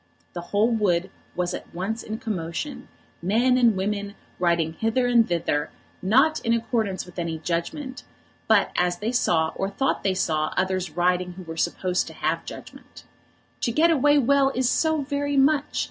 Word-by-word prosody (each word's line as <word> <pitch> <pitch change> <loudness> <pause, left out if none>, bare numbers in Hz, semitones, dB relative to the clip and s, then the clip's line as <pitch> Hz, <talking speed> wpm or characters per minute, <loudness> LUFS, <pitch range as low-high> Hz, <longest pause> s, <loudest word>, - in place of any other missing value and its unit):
The 175 - -5
whole 215 +4 +2
wood 190 -4 +1 0.2
was 180 0 -1
at - - -8
once 210 +6 -3
in 220 - -5
commotion, 205 - -4 0.3
men 230 +8 +3
and 240 -4 +4
women 200 +1 -2 0.2
riding 170 -2 +1
hither 225 +7 0
and 235 -2 +4
thither, 165 -4 -1 0.3
not 270 +11 +3
in 230 -1 0
accordance 225 -4 -1
with 180 0 -10
any 165 -1 -2
judgment; 175 - -4 0.5
but 220 -2 +4
as 175 0 +1
they 215 +5 -2
saw 160 -10 +2
or 195 - -2
thought 270 +6 -1
they 190 -2 +1
saw 155 -4 0
others 185 -3 -1
riding 180 0 +1
who 185 +1 -10
were 165 -1 -7
supposed 180 +2 0
to - - -9
have - - -1
judgment. - - -11 0.6
To 235 - 0
get 320 +7 +4
away 290 -1 +4
well 280 +1 +4
is 255 0 +1
so 315 +3 +1
very 285 0 -1
much! 285 +1 +2
205 Hz, 170 wpm, -24 LUFS, 175-255 Hz, 0.6 s, and